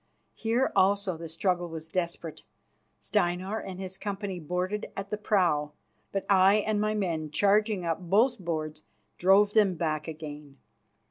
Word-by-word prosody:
Here 235 +4 0
also 195 -1 +3
the 165 0 -8
struggle 175 +1 -1
was 160 -1 -7
desperate. 170 -2 -3 0.6
Steinar 185 +5 0
and 185 -1 -7
his 190 0 -7
company 200 -2 -4
boarded 180 +5 -2
at 195 0 -5
the 210 - -1
prow, 170 -8 +1 0.4
but 195 - -2
I 195 0 +6
and 215 0 +1
my 215 0 0
men, 165 -7 -1
charging 205 +3 +2
up 165 +1 -1
both 210 +8 +2
boards, 155 -3 -4 0.4
drove 200 +3 +5
them 205 -4 +4
back 155 -2 -2
again. 150 -3 -8
185 Hz, 145 wpm, -28 LUFS, 165-205 Hz, 0.6 s, I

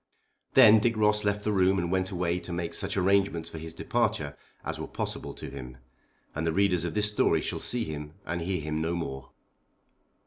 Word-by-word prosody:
Then 110 -4 +8
Dick 115 +1 +1
Ross 105 0 +3
left 105 0 0
the 105 - 0
room 95 -1 +3
and 85 -1 -1
went 95 0 +1
away 90 -1 -1
to 90 0 -8
make 85 -1 -3
such - - -2
arrangements 95 -3 +2
for 80 - -7
his 80 +1 -7
departure 105 -5 -1 0.3
as - - -3
were - - -4
possible - - -4
to - - -8
him, 65 -2 -8 0.6
and 80 - -3
the 80 - +1
readers 90 -1 +2
of 85 - -3
this 105 -1 +3
story 105 - +3
shall - - -3
see 120 -1 0
him 75 -1 -6
and 85 0 -3
hear 90 0 -1
him 75 +1 -2
no 85 +2 -1
more. 65 -5 -5
90 Hz, 205 wpm, -28 LUFS, 80-105 Hz, 0.6 s, Then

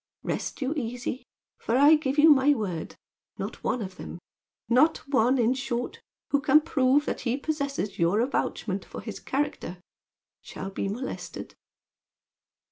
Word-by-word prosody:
Rest - - -3
you 265 +3 0
easy, 245 -1 -4 0.3
for 230 - 0
I 290 +3 +7
give 295 -2 +1
you 310 +1 +8
my 285 +1 +5
word, 185 -8 -4 0.4
not - - -6
one 245 - 0
of 185 -1 -8
them - - -7 0.5
not 265 +6 +3
one, 255 -1 +3
in 240 0 +3
short, 260 - -3 0.3
who 285 - +3
can 300 +2 +5
prove 280 -1 +2
that - - -3
he 245 +1 0
possesses 280 -8 -3
your 170 +5 +3
avouchment 275 - -2
for - - -9
his - - -7
character 265 - -3 0.6
shall 195 - -7
be 195 - -2
molested." 240 +7 -6
260 Hz, 145 wpm, -27 LUFS, 230-285 Hz, 0.6 s, you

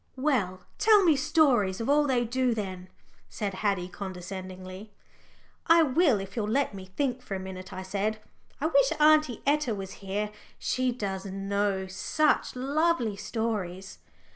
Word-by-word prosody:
"Well, 230 -10 0 0.2
tell 425 -2 +6
me 330 -4 +5
stories 270 - +2
of 230 - -3
all 290 +1 +4
they 245 -3 +2
do 250 0 0
then," 185 -3 -5 0.4
said 205 -2 -3
Haddie 190 -2 -1
condescendingly. 185 +1 -7 0.8
"I 330 0 +7
will 280 - +3
if 195 0 -8
you'll 210 -2 -1
let 270 0 +1
me 190 -1 -8
think 250 +7 -2
for 200 - -5
a - - -3
minute," 185 -1 -8
I 185 0 -6
said. 205 +3 -1 0.4
"I 290 - -2
wish 280 -4 +4
Aunty 305 -5 +4
Etta 285 -5 +2
was 195 -1 -6
here 205 +2 -2 0.3
she 255 0 0
does 200 -5 -4
know 195 0 -1
such 290 +13 0
lovely 275 -3 +1
stories." 195 -4 -4
210 Hz, 150 wpm, -28 LUFS, 190-275 Hz, 0.8 s, I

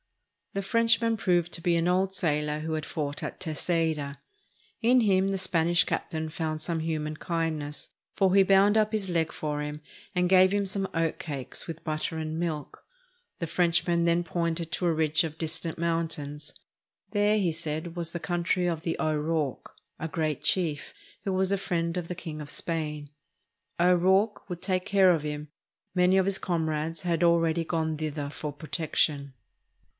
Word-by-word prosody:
The 195 - -2
Frenchman 230 +1 +3
proved 175 -4 +1
to 170 - 0
be 170 0 +2
an 165 +1 +1
old 190 +2 +2
sailor 150 -4 0
who 160 +1 -3
had 155 -1 -2
fought 145 -2 -3
at - - -5
Terceira. 160 -3 -1 0.6
In 245 +2 +5
him 195 -3 +3
the 195 - 0
Spanish 175 -2 +3
captain 160 0 -2
found 155 0 -3
some 165 +1 -2
human 155 -1 -2
kind 165 -2 -1
ness, 145 0 -6 0.3
for 190 -2 +3
he 195 - +7
bound 195 +2 +5
up 215 -1 +3
his 210 -4 -1
leg 165 -1 +1
for 150 -2 -3
himand 155 +5 -4
gave 185 0 +6
him 205 0 +2
5" - - 0
SPAIN 195 0 -1
some - - -1
oatcakes 155 -4 -2
with 165 -1 -7
butter 155 0 -2
and 160 0 -3
milk. 160 -4 -4 0.6
The 165 - -2
Frenchman 170 0 +2
then 170 +1 +3
pointed 170 -1 -2
to 180 - 0
a - - +4
ridge 155 +1 +2
of 160 -1 -5
distant 165 0 -2
mountains. 160 -3 -2 0.6
There, 205 +1 +3
he 185 -5 +2
said, 160 +1 -4
was 170 -2 -3
the 170 - -4
country 175 +1 0
of 165 -2 -1
the 165 0 -2
O'Rourke, 155 -2 -1 0.3
a 160 - -2
great 155 -3 -1
chief, 160 -6 0 0.3
who 195 - -1
was 190 0 +1
a - - +2
friend 170 -2 -1
of 175 -2 -3
the 180 - -3
King 160 -3 -6
of 145 - -8
Spain. 150 -3 -3 0.7
O'Rourke 190 +5 +3
would 175 -1 -6
take 185 -1 0
care 195 -2 +5
of 165 -3 +1
him; 150 0 -4 0.5
many 180 +1 +4
of 190 - +4
his 195 0 0
comrades 160 -1 -2
had 170 -2 +1
already 170 -1 +3
gone 160 -1 -1
thither 150 -2 -3
for 150 0 -5
protection. 145 -2 -1
165 Hz, 175 wpm, -28 LUFS, 155-180 Hz, 0.7 s, he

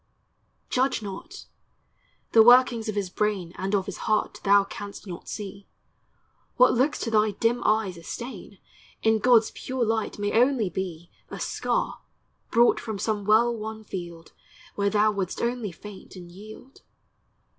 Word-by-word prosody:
Judge 255 -3 +1
not; 210 - -8 0.9
the 225 - +7
workings 240 -1 +5
of 215 - -3
his 195 -3 -2
brain 195 -5 -1
And 195 +2 -1
of 190 -2 0
his 195 -3 -6
heart 215 0 0
thou 200 0 +5
canst 200 +1 -9
not 175 -3 -8
see; 200 -1 -7 0.9
What - - +5
looks 265 +5 +1
to 230 - -2
thy 215 -1 +3
dim 235 +1 +1
eyes 215 -4 +1
a 170 - -12
stain, 220 -2 -8 0.5
In 220 0 +3
God's 230 -1 +4
pure 255 -2 -3
light 225 0 -1
may 205 0 -1
only 240 -4 +3
be 175 -3 -5 0.2
A - - -7
scar, - - -2 0.5
brought 235 +1 +4
from 220 -2 -5
some 205 0 -2
well 230 +3 +4
won 220 0 -7
field, 170 -5 -8 0.4
Where 200 0 0
thou 215 +1 +3
wouldst 195 -3 -3
only 235 -4 -2
faint 200 +3 -12
and 175 -2 -11
yield. 215 +8 -13
215 Hz, 155 wpm, -26 LUFS, 195-230 Hz, 0.9 s, the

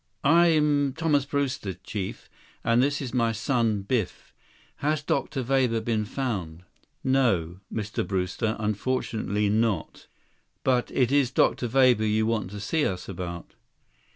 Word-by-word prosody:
"I'm 150 -3 +4
Thomas 150 -3 +1
Brewster, 140 -9 -2
Chief. 95 +1 -6 0.4
And 115 +1 +3
this 140 +1 0
is 125 - -6
my 115 -2 +2
son, 115 -2 0
Biff. 110 -1 -2 0.4
Has 150 +1 0
Dr. 140 -2 -1
Weber 125 -2 +2
been 110 -2 -1
found?" 100 -10 -4 0.4
"No, 100 - +1
Mr. 105 -1 -3
Brewster, 95 +4 -1
unfortunately 105 -1 -1
not." 110 0 -1 0.6
"But 125 -2 +2
it 125 -1 +1
is 140 -3 +3
Dr. 125 -1 +2
Weber 125 -2 +4
you 110 0 +2
want 110 -5 -1
to 105 +1 -7
see 145 +10 0
us 90 -6 -2
about?" 85 -2 -6
115 Hz, 130 wpm, -26 LUFS, 105-135 Hz, 0.6 s, I'm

